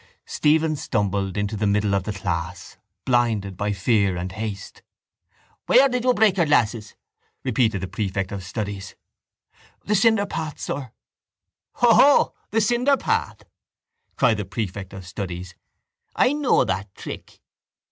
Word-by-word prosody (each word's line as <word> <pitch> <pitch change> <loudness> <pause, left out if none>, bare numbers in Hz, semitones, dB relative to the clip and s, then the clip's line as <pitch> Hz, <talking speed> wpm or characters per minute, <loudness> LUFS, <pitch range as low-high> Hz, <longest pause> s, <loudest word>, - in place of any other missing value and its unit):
Stephen 155 +1 +2
stumbled 100 -7 -1
into 105 +1 -1
the 105 0 0
middle 105 0 +1
of 100 -2 0
the 105 - -2
class, 90 -2 -4 0.3
blinded 115 -6 +1
by 100 +3 -2
fear 100 -1 +1
and 90 +1 -4
haste. 100 0 -6 0.9
—Where 270 +2 +6
did 250 -2 -2
you 255 - +4
break 205 -2 +3
your 170 -3 +3
glasses? 115 -6 +1 0.5
repeated 115 -6 +1
the 95 - -3
prefect 95 -2 -3
of 100 -2 -5
studies. 100 -1 -5 0.9
—The 210 - 0
cinderpath, 200 - +1
sir. 130 -4 -5 0.8
—Hoho! 245 +4 +5 0.2
The 225 - +1
cinderpath! 245 +5 +1 0.7
cried 110 - +3
the 105 - -3
prefect 100 -1 -5
of 95 -1 -9
studies. 90 -1 -6 0.6
I 255 - +3
know 295 -3 +3
that 95 +1 -3
trick. - - -9
105 Hz, 130 wpm, -23 LUFS, 95-155 Hz, 0.9 s, Where